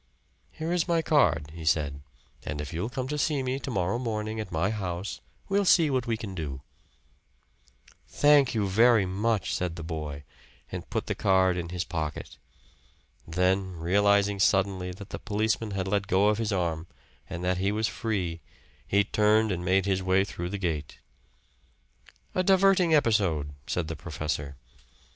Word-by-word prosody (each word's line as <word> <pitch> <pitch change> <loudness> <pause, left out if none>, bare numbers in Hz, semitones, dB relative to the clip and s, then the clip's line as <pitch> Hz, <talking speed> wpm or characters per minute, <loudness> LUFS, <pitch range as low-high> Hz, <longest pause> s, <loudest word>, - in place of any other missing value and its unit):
"Here 160 +2 -5
is 175 -1 +1
my 165 -2 +2
card," 80 - +2
he 85 -1 -8
said; 75 -3 0 0.4
"and 75 - -5
if 75 +2 -5
you'll 90 +8 -2
come 130 0 -4
to 150 +2 -3
see 145 -2 +1
me 130 +1 -2
to 135 - -6
morrow 95 -1 0
morning 110 -2 -3
at 105 -3 -5
my 85 +5 0
house, 95 -2 -4 0.3
we'll 200 +1 +2
see 165 -5 +5
what 130 -2 0
we 115 -1 0
can 110 -4 -6
do." 70 -7 -5 1.4
"Thank 145 -4 +4
you 105 -3 +1
very 110 +1 +5
much," 100 -1 -1
said 90 -2 -2
the 85 - -7
boy, 75 -3 -5 0.5
and - - -6
put - - -2
the - - -1
card 95 -1 +3
in 85 -1 -4
his 90 0 -2
pocket. 80 -4 -5 0.9
Then, 90 +3 +1
realizing 100 +4 +2
suddenly 95 -1 +2
that 95 +3 -9
the - - -5
policeman 110 +1 -1
had 95 0 -2
let 100 0 0
go 100 +3 +3
of 105 +1 0
his 110 -1 -1
arm, 85 -3 -1 0.4
and 85 - -5
that 90 0 0
he 95 +2 +1
was 110 +1 0
free, 95 -9 -3 0.5
he 100 +1 +3
turned 105 +1 +3
and 90 -1 -3
made 95 +1 +2
his 95 -1 +1
way 95 +1 +3
through 90 -3 -5
the 100 - -3
gate. 85 -6 -3 1.4
"A 185 - +1
diverting 190 -2 +4
episode," 95 - +1
said 90 -3 -1
the 80 - -4
professor. 75 -2 -4
95 Hz, 170 wpm, -27 LUFS, 85-110 Hz, 1.4 s, see